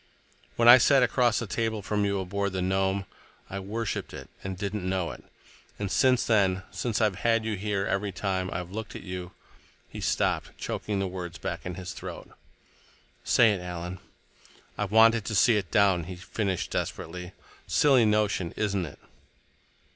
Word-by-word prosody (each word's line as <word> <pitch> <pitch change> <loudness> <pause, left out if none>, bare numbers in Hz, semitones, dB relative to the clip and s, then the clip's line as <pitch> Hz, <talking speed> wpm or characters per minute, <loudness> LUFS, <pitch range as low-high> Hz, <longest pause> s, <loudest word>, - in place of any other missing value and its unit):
"When 115 - +3
I 120 +2 +11
sat 135 +1 +5
across 120 -1 +2
the 115 - -1
table 110 +1 -2
from 105 +1 0
you 100 -1 0
aboard 100 +1 -2
the 95 - -1
Nome, 95 +1 0 0.5
I 100 - -3
worshiped 105 +3 -4
it - - -9
and 95 -1 -4
didn't 100 -1 -3
know 95 -4 -1
it. - - -11 0.5
And 100 -2 -3
since 125 +7 +3
then—since 100 +2 0
I've 105 -5 +1
had 115 -1 +1
you 110 -1 -1
here—every 100 0 -1
time. 95 -1 -2
I've 90 0 -5
looked 110 +1 -6
at - - -7
you—" 90 -1 -6 0.6
He - - -8
stopped, - - 0
choking 105 -1 -3
the 95 0 0
words 90 -1 -6
back 90 -2 -5
in 90 - -5
his 90 0 -6
throat. - - -8 0.9
"Say 115 -2 +5
it, 95 - -4
Alan." 90 0 -6 0.8
"I've 105 -1 -2
wanted 115 0 +6
to 110 - -2
see 115 +3 +5
it 95 -5 -1
down," 100 -6 +3
he 90 +1 -7
finished 95 -3 -3
desperately. 90 0 -4 0.3
"Silly 135 -5 +4
notion, 105 -5 +1
isn't 100 -5 -1
it?" - - -12
100 Hz, 165 wpm, -27 LUFS, 90-110 Hz, 0.9 s, I